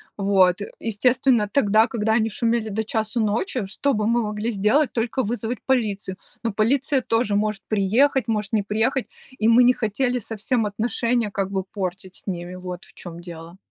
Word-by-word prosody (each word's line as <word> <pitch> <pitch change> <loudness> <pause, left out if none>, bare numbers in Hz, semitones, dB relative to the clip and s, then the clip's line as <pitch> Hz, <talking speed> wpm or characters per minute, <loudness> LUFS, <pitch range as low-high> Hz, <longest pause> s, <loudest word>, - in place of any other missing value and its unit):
Вот, 195 -1 +3
э, - - -5
естественно, 230 0 +2
тогда, 220 -3 +4
когда 220 -3 0
они 225 0 +2
шумели 230 0 0
до 220 +2 -2
часу 220 +1 -1
ночи, 225 - 0
что 265 +8 -1
бы 210 0 0
мы 235 +1 +2
могли 210 +2 -2
сделать? 220 +8 +2
Только 240 +2 -1
вызвать 235 +2 -3
полицию. 205 -7 -1 0.2
Но 230 -3 -2
полиция 265 +6 +1
тоже 225 -3 0
может 210 -1 -1
приехать, 230 +6 +2
может 210 -1 -1
не 215 - +3
приехать, 225 +6 0 0.3
и 220 - +1
мы 240 +2 +7
не 250 - +6
хотели 245 +3 -1
совсем 225 +2 -1
отношения 230 +1 -1
как 195 -1 -2
бы 190 -1 -1
портить 190 -1 -5
с - - -13
ними, 180 -1 -4
вот 180 -1 -7
в - - -18
чем 170 -1 -9
дело. 170 0 -10
215 Hz, 180 wpm, -23 LUFS, 200-240 Hz, 0.3 s, мы